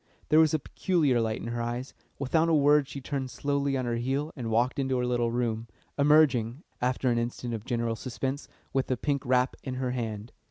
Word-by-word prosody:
There 155 - +6
was 160 -2 +5
a - - +4
peculiar 150 -5 +1
light 110 0 -1
in 115 - -5
her 120 0 -2
eyes. 120 +3 -4 0.2
Without 160 +5 +2
a 165 - +4
word 145 -1 +4
she 140 - -7
turned 135 -1 -3
slowly 140 0 -1
on 130 - -2
her 120 -1 -1
heel 135 +6 -1
and 120 -5 -4
walked 120 +5 +1
into 130 -1 0
her 125 - 0
little 120 -1 +1
room, 115 -1 -1 0.3
emerging, 140 -3 +3 0.2
after 125 0 +1
an 120 - +2
instant 120 0 -3
of 110 -1 -5
general 115 -2 -1
suspense, 130 +4 -4 0.3
with 135 -1 +1
the 130 - 0
pink 140 +1 -1
wrap 125 +1 +2
in 130 -2 -5
her 130 -1 -1
hand. 115 -3 -4
130 Hz, 210 wpm, -28 LUFS, 120-140 Hz, 0.3 s, There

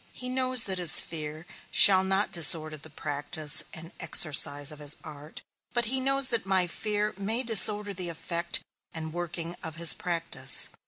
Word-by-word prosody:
He 250 - -5
knows 255 -1 0
that 190 -3 -3
his 175 -4 +7
fear 155 0 -7 0.2
shall 190 -2 +6
not 195 +2 -3
disorder 155 -2 +5
the 155 +1 -15
practice 150 +2 +1
and 165 +1 -15
exercise 145 -4 0
of 150 - -14
his 145 0 -1
art, 150 +1 -14 0.3
but 240 -1 -1
he 260 +4 -1
knows 270 0 -1
that 235 -3 -4
my 190 -1 -2
fear 210 +4 -5
may 220 +5 -2
disorder 210 -2 +1
the 180 -2 -8
effect 170 +1 -5 0.3
and 160 -1 -9
working 175 0 -8
of 160 -1 -10
his 170 0 +6
practice. 165 -7 -1
175 Hz, 165 wpm, -24 LUFS, 155-210 Hz, 0.3 s, his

